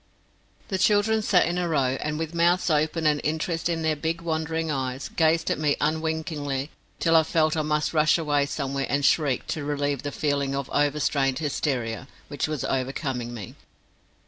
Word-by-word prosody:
The 190 Hz, -3 st, -1 dB
children 215 Hz, +2 st, +3 dB
sat 195 Hz, -3 st, +3 dB
in 175 Hz, +1 st, -1 dB
a 175 Hz, -1 st, -1 dB
row 135 Hz, -4 st, +1 dB
and, 150 Hz, 0 st, -2 dB
with 160 Hz, +1 st, -4 dB
mouths 170 Hz, +1 st, +2 dB
open 155 Hz, +2 st, +1 dB
and 150 Hz, -1 st, +3 dB
interest 165 Hz, +2 st, -1 dB
in 165 Hz, -1 st, -1 dB
their 160 Hz, -1 st, +1 dB
big 160 Hz, +3 st, -2 dB
wondering 160 Hz, -1 st, -2 dB
eyes, 130 Hz, -1 st, -3 dB
gazed 165 Hz, 0 st, +2 dB
at -, -, -1 dB
me 150 Hz, -2 st, +1 dB
unwinkingly 155 Hz, -3 st, -2 dB, 0.3 s
till 165 Hz, 0 st, +3 dB
I 160 Hz, -, +8 dB
felt 155 Hz, 0 st, +1 dB
I 155 Hz, -, +1 dB
must 150 Hz, +1 st, 0 dB
rush 155 Hz, 0 st, +4 dB
away 145 Hz, -3 st, +1 dB
somewhere 140 Hz, -1 st, -2 dB
and 140 Hz, 0 st, +1 dB
shriek 140 Hz, -3 st, +2 dB
to 155 Hz, -, -2 dB
relieve 145 Hz, -1 st, -1 dB
the 145 Hz, -, -4 dB
feeling 140 Hz, -2 st, -1 dB
of 140 Hz, -1 st, -4 dB
overstrained 145 Hz, -2 st, +1 dB
hysteria 130 Hz, -5 st, -2 dB, 0.2 s
which 145 Hz, 0 st, -2 dB
was 155 Hz, -3 st, -3 dB
overcoming 130 Hz, -2 st, -2 dB
me. 110 Hz, -6 st, -8 dB
150 Hz, 175 wpm, -25 LUFS, 140-160 Hz, 0.3 s, I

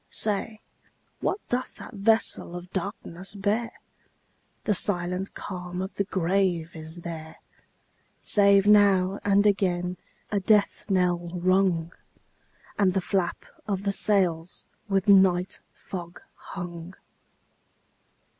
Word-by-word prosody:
Say, 215 Hz, +1 st, 0 dB, 0.6 s
what -, -, 0 dB
doth 250 Hz, +1 st, -2 dB
that -, -, -10 dB
vessel 210 Hz, -3 st, +1 dB
of 175 Hz, +1 st, -8 dB
darkness 190 Hz, 0 st, -4 dB
bear? 210 Hz, +4 st, 0 dB, 0.9 s
The 210 Hz, -, +2 dB
silent 180 Hz, 0 st, -1 dB
calm 180 Hz, -1 st, -6 dB
of 190 Hz, +2 st, -4 dB
the 200 Hz, -, -1 dB
grave 180 Hz, -3 st, 0 dB
is 160 Hz, +2 st, -7 dB
there, 160 Hz, -1 st, -7 dB, 0.8 s
Save 200 Hz, -1 st, +4 dB
now 200 Hz, -2 st, +5 dB
and 200 Hz, 0 st, +3 dB
again 180 Hz, -3 st, +1 dB, 0.3 s
a 205 Hz, -, +1 dB
death 205 Hz, +1 st, +2 dB
knell 175 Hz, -2 st, +1 dB
rung, 180 Hz, -2 st, +2 dB, 0.9 s
And 190 Hz, -2 st, +3 dB
the -, -, +3 dB
flap 185 Hz, -1 st, -1 dB, 0.2 s
of 200 Hz, -2 st, -2 dB
the 200 Hz, -, +1 dB
sails 185 Hz, -5 st, 0 dB, 0.2 s
with 195 Hz, -1 st, +1 dB
night 190 Hz, -2 st, +4 dB
fog 175 Hz, -2 st, -8 dB
hung. 175 Hz, -1 st, -8 dB
190 Hz, 110 wpm, -26 LUFS, 175-200 Hz, 0.9 s, now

